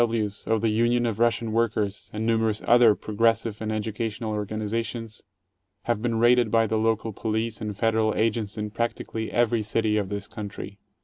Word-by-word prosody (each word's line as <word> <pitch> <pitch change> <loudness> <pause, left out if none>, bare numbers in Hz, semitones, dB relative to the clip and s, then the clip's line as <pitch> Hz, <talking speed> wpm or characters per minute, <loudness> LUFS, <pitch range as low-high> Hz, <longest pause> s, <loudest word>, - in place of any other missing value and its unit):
W. 115 -2 +2
Ws., 105 0 -4
of 110 -1 +1
the 115 - +2
Union 120 +2 +2
of 115 -2 -2
Russian 115 -1 +1
Workers, 110 -3 -1
and 110 +1 -3
numerous 110 -2 +1
other 120 -2 +6
8 100 - -14
progressive 115 0 0
and 110 0 -2
educational 110 +1 -3
organizations, 110 +2 -3 0.6
have 120 -3 -1
been 115 -1 0
raided 120 0 +4
by 115 +1 +3
the 110 0 0
local 110 0 0
police 110 +1 -2
and 105 -2 -4
Federal 110 -1 +1
agents 110 -1 0
in 105 0 -3
practically 115 0 -3
every 120 -1 +2
city 110 0 0
of 100 -3 -1
this 100 -1 -3
country. 100 -2 -8
110 Hz, 180 wpm, -25 LUFS, 105-115 Hz, 0.6 s, other